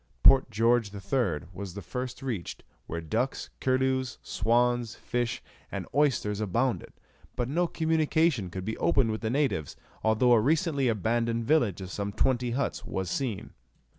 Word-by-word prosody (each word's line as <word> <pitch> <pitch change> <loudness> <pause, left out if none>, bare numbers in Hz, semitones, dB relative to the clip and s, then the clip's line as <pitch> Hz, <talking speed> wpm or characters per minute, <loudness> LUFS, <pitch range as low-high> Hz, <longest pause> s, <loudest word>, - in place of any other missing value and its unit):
Port 135 -1 +7
George 115 0 +2
III. 100 - 0
was 95 -1 -7
the 100 - -5
first 125 +7 -5
reached, 115 -10 -4 0.2
where 85 +1 -4
ducks, 125 - -2
curlews, 130 0 +1
swans, 120 +1 +1
fish, 120 -1 -2 0.3
and - - -4
oysters 120 -8 +1
abounded; 115 +5 0 0.4
but 120 -1 -1
no 170 +6 +1
communication 160 - +1
could 95 +1 -6
be 110 +1 -2
opened 120 -5 +3
with 110 - -4
the 110 - -1
natives, 130 - 0 0.3
although 110 +3 +3
a 115 - +5
recently 150 - +2
abandoned 115 +1 0
village 120 - +2
of 95 -1 -7
some 100 0 -3
twenty 125 +2 +1
huts 130 +4 -2
was 95 -2 -3
seen. 125 -8 -3
120 Hz, 150 wpm, -28 LUFS, 105-130 Hz, 0.4 s, Port